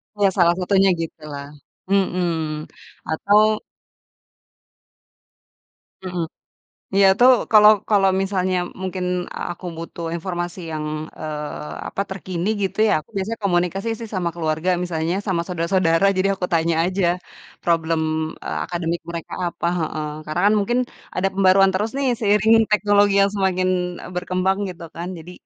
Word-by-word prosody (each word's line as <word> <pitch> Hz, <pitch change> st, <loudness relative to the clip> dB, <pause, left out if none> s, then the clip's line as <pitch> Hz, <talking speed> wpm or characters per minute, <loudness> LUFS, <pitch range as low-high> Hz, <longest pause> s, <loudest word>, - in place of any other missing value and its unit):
Ya, 200 Hz, -2 st, +3 dB
salah 175 Hz, -2 st, +3 dB
satunya 190 Hz, +1 st, +3 dB
gitulah. 150 Hz, -4 st, -7 dB, 0.4 s
Mhm, 170 Hz, -5 st, 0 dB, 0.4 s
atau 210 Hz, +6 st, +3 dB, 2.4 s
Mhm. 180 Hz, -2 st, -3 dB, 0.7 s
Iya 195 Hz, 0 st, +6 dB
tuh 250 Hz, +1 st, +8 dB, 0.2 s
kalau 210 Hz, -1 st, +9 dB, 0.2 s
kalau 195 Hz, -2 st, +4 dB
misalnya 190 Hz, -1 st, 0 dB, 0.3 s
mungkin 185 Hz, -1 st, -3 dB, 0.5 s
aku 175 Hz, +1 st, -7 dB
butuh 165 Hz, 0 st, -6 dB
informasi 175 Hz, +1 st, -4 dB
yang, 155 Hz, -1 st, -3 dB, 0.4 s
eee, 150 Hz, -, -5 dB, 0.2 s
apa, -, -, -4 dB
terkini 185 Hz, -1 st, -3 dB
gitu 195 Hz, -, -2 dB
ya, -, -, +3 dB
aku 150 Hz, -, -23 dB
biasa 195 Hz, +3 st, -2 dB
komunikasi 185 Hz, +2 st, 0 dB
sih 230 Hz, -, -7 dB
sama 180 Hz, -2 st, 0 dB
keluarga 160 Hz, +1 st, -1 dB
misalnya 165 Hz, -1 st, -1 dB
sama 180 Hz, -4 st, 0 dB
saudara-saudara 170 Hz, 0 st, +2 dB
jadi 190 Hz, +1 st, +2 dB
aku 185 Hz, -1 st, -3 dB
tanya 165 Hz, 0 st, +2 dB
aja 185 Hz, +1 st, 0 dB, 0.6 s
problem, 165 Hz, -1 st, +1 dB, 0.4 s
eee, 75 Hz, -, -3 dB
akademik 170 Hz, 0 st, -2 dB
mereka 170 Hz, -1 st, -6 dB
apa. 170 Hz, -, -3 dB
Heeh. 155 Hz, -2 st, -3 dB, 0.2 s
Karena 155 Hz, +3 st, -2 dB
kan -, -, +3 dB
mungkin 240 Hz, +5 st, +1 dB, 0.4 s
ada 190 Hz, +1 st, +2 dB
pembaruan 195 Hz, 0 st, +5 dB
terus 210 Hz, +4 st, -1 dB
nih 275 Hz, -1 st, +1 dB
seiring 210 Hz, +1 st, +4 dB, 0.2 s
teknologi 205 Hz, -1 st, +4 dB
yang 200 Hz, -, +3 dB
semakin, 185 Hz, -1 st, +1 dB, 0.3 s
eee, -, -, -9 dB
berkembang 185 Hz, +2 st, 0 dB
gitu 175 Hz, -1 st, -8 dB
kan 170 Hz, +1 st, -4 dB
jadi, 170 Hz, +2 st, -10 dB
180 Hz, 135 wpm, -21 LUFS, 165-195 Hz, 2.4 s, kalau